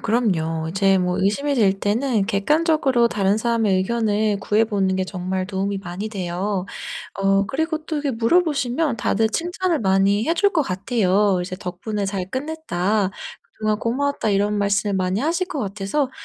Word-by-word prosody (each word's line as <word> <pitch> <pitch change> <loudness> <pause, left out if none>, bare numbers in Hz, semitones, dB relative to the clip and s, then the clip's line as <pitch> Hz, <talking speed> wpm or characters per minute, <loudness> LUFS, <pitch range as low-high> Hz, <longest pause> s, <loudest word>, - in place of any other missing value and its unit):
그럼요. 165 -8 0
이제 195 +2 +3
뭐 180 -1 0
의심이 280 +9 +1
들 205 -6 +4
때는 220 0 +1
객관적으로 265 - +2
다른 200 -1 +1
사람의 225 -3 +1
의견을 210 0 0
구해 210 +2 +2
보는 195 -4 0
게 190 - 0
정말 185 0 -3
도움이 195 +1 -2
많이 195 +3 -5
돼요. 190 0 -3 0.5
어 195 0 +2
그리고 315 +3 -1
또 315 - -3
이렇게 290 -2 -1
물어보시면 275 +1 +1
다들 220 +2 +1
칭찬을 350 - -1
많이 195 +3 +2
해 330 - +3
줄 405 +3 +3
것 320 - +2
같아요. 200 -2 +1
이제 185 0 -5
"덕분에 200 +4 -4
잘 190 -1 -3
끝냈다. 220 - -1 0.4
그동안 215 -1 -1
고마웠다." 275 +1 -1
이런 205 +1 +1
말씀을 200 0 +1
많이 185 +1 0
하실 340 +5 0
것 300 - -4
같아서 205 +7 -2
210 Hz, 345 characters per minute, -22 LUFS, 195-255 Hz, 0.5 s, 들